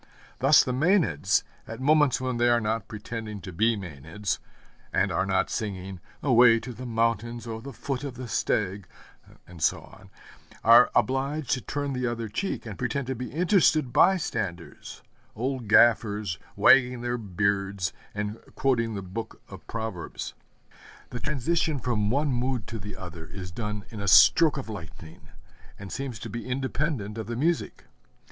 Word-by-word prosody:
Thus 135 +2 +6
the 130 - -2
Mænads, 150 - +2 0.2
at 115 - -7
moments 145 0 +3
when 130 -1 -2
they 120 +1 +3
are 120 0 +4
not 110 -1 -2
pretending 105 0 -6
to 95 - -8
be 110 +5 +2
Mænads, 85 +2 -4 0.5
and - - +1
are 95 - 0
not 95 -1 +1
singing, 95 -7 -4 0.2
'Away 120 -3 +6
to 125 - -7
the 125 +2 -8
mountains, 115 0 -1
O 110 -1 -5
the 140 - -8
foot 135 +1 -4
of 140 -3 -5
the 125 0 -7
stag,' 100 -3 -1 0.6
and 85 -2 -13
so 80 - +2
on, - - -16 0.5
are 120 +2 +8
obliged 135 +3 0
to 130 -3 +1
turn 145 +1 -3
the 125 -1 -1
other 115 -1 -3
cheek, 190 - -3
and 110 -3 -8
pretend 125 +2 -1
to 130 - -2
be 125 +1 -6
interested 160 - +3
by 190 +6 +5
standers 95 - -5 0.3
old 125 0 -3
gaffers, 105 -4 +3 0.2
wagging 125 -2 +5
their 120 0 -2
beards, 100 -2 -1 0.2
and 105 +1 -3 0.2
quoting 115 -5 +1
the 100 - -5
book 110 +5 -7
of - - -12
Proverbs. 110 -6 -5 0.8
The 120 - -5
transition 150 +3 0
from 110 -4 0
one 145 +5 +1
mood 125 -2 -1
to 115 - -5
the 100 +2 -7
other 85 -3 -9
is 90 +1 -8
done 105 0 -5
in 110 -3 -7
a 100 - -4
stroke 155 - +6
of 135 - -5
lightning, 80 -6 -10 0.5
and 100 -1 -9
seems 135 -4 -4
to - - -6
be 120 +1 -6
independent 130 -4 -2
of 110 - -5
the 120 - -3
music. 165 +7 -1
115 Hz, 165 wpm, -27 LUFS, 100-130 Hz, 0.8 s, are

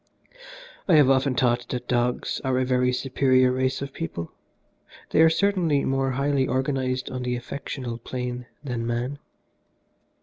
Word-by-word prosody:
"I 180 - +5
have 145 -3 +6
often 130 0 +2
thought 120 -1 +1
that 125 -1 -4
dogs 120 0 0
are 130 -1 +1
a 130 - +1
very 125 0 +2
superior 130 0 +2
race 130 +1 0
of 140 -1 -7
people. 85 0 -5 0.8
They - - +4
are 160 - +7
certainly 170 -5 +1
more 135 0 +1
highly 140 0 +1
organised 130 0 -1
on 130 - -4
the 125 0 -1
affectional 120 -1 -5
plane 125 0 -5 0.2
than 120 -4 -3
man. 125 +4 -2
130 Hz, 145 wpm, -25 LUFS, 125-135 Hz, 0.8 s, are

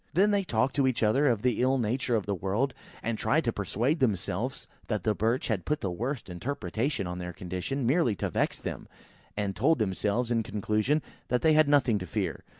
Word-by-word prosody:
Then 200 +4 +5
they 200 -1 +2
talked 125 -5 0
to 135 -2 +4
each 130 -3 0
other 130 +7 +3
of 115 -5 +1
the 125 -2 +2
ill 130 +2 +3
nature 120 +1 0
of 105 - 0
the 100 - -1
world, 100 +8 -1 0.3
and 115 -1 -2
tried 150 +9 +2
to 115 -4 0
persuade 120 - 0
themselves 110 -9 -1 0.2
that 105 -4 -1
the 110 - +2
Birch 115 +5 0
had 105 -6 -1
put 150 0 -1
the 95 - -1
worst 120 +8 -3
interpretation 115 - -2
on 90 0 -4
their 90 0 -5
condition, 95 - -3
merely 130 - +3
to - - -3
vex - - 0
them; - - -6 0.5
and 100 -2 -1
told 160 - +3
themselves, 110 +3 0
in 115 -1 +2
conclusion, 110 +7 0 0.2
that 125 0 0
they 160 -1 +5
had 155 -1 +5
nothing 130 -7 +4
to 90 - -6
fear. - - -2
115 Hz, 210 wpm, -29 LUFS, 100-135 Hz, 0.5 s, Then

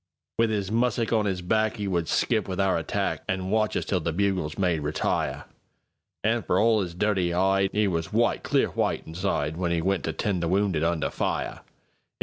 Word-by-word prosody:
With 115 -1 +4
'is 100 -2 -2
mussick 120 0 +1
on 110 -2 +2
'is 90 -2 -2
back,'E 110 +2 0
would 85 -4 0
skip 110 +7 +1
with 95 -1 -4
our 95 -1 +3
attack, 80 - -2
An' 95 0 -1
watch 110 0 +1
us - - -2
till 95 - 0
the 85 0 -2
bugles 90 -4 -1
made 90 -4 +1
"Retire."An' 80 +8 -3
for - - +1
all 110 -1 +4
'is 85 -3 -5
dirty 95 -2 +1
'ide,'E 95 +3 +2
was 85 -3 -2
white, 115 +2 +2
clear - - +1
white, - - -1
insideWhen 85 -1 -2
'e 85 - 0
went 95 -1 0
to 80 - -1
tend 95 0 -1
the 85 - 0
wounded 95 -3 +1
under 80 -4 0
fire! - - -2
95 Hz, 180 wpm, -26 LUFS, 85-105 Hz, -, With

